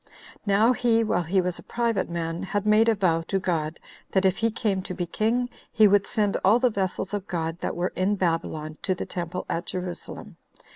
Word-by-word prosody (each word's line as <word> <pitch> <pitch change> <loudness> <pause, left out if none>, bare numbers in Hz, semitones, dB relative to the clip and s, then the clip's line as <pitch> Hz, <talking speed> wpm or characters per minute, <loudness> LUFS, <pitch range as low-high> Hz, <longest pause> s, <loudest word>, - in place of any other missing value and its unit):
Now 215 +5 +4
he, 230 -2 +2
while 195 -5 +1
he 180 +3 +1
was 180 -1 -2
a - - -11
private 230 -6 -1
man, 170 0 -3
had 195 +2 -2
made 215 +2 +5
a 225 - +3
vow 175 -5 +2
to 195 - 0
God, 165 -4 -2 0.3
that 190 0 +3
if 190 0 +3
he 230 0 +2
came 210 -4 -1
to 185 -1 -6
be 175 -1 -2
king, 225 +7 0 0.2
he 215 -2 +6
would 200 0 +3
send 205 -2 +1
all 205 +5 +6
the 250 0 +2
vessels 195 0 -2
of 205 -1 -3
God 165 -1 -3
that - - -3
were 175 +2 -1
in 190 +3 +1
Babylon 165 -4 -2
to 185 - 0
the - - -4
temple 175 0 -4
at 170 +1 -3
Jerusalem. 180 -1 -6
190 Hz, 210 wpm, -26 LUFS, 175-215 Hz, 0.3 s, he